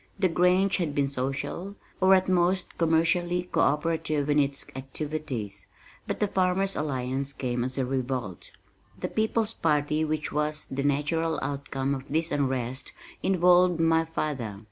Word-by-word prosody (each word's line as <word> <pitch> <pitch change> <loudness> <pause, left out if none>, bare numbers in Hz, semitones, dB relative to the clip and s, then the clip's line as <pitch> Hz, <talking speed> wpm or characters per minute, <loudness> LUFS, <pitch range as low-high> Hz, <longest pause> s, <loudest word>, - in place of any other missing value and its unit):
The 190 -2 +2
Grange 180 +3 +3
had 160 -6 -2
been 140 -1 +2
social, 140 +8 -3 0.3
or 190 +1 +7
at 185 0 +2
most 180 0 +1
commercially 175 +2 +2
co 180 - -3
operative 150 0 +1
in 145 - +4
its 140 -1 0
activities, 130 - -4 0.4
but - - -3
The 210 - +2
Farmers' 190 +1 +1
Alliance 135 -1 -2
came 125 -2 -2
as 130 +1 -4
a 130 - +1
revolt. 125 -7 -3 0.5
The - - -3
People's 220 0 0
Party 150 -2 +1
which 155 -1 -2
was 150 0 -1
the 135 +1 -3
natural 150 +3 0
outcome 140 -1 -2
of 135 -1 -5
this 160 +3 0
unrest 130 -2 -2 0.3
involved 180 -1 +4
my 165 0 +4
father. 140 -10 -3
150 Hz, 145 wpm, -27 LUFS, 135-175 Hz, 0.5 s, or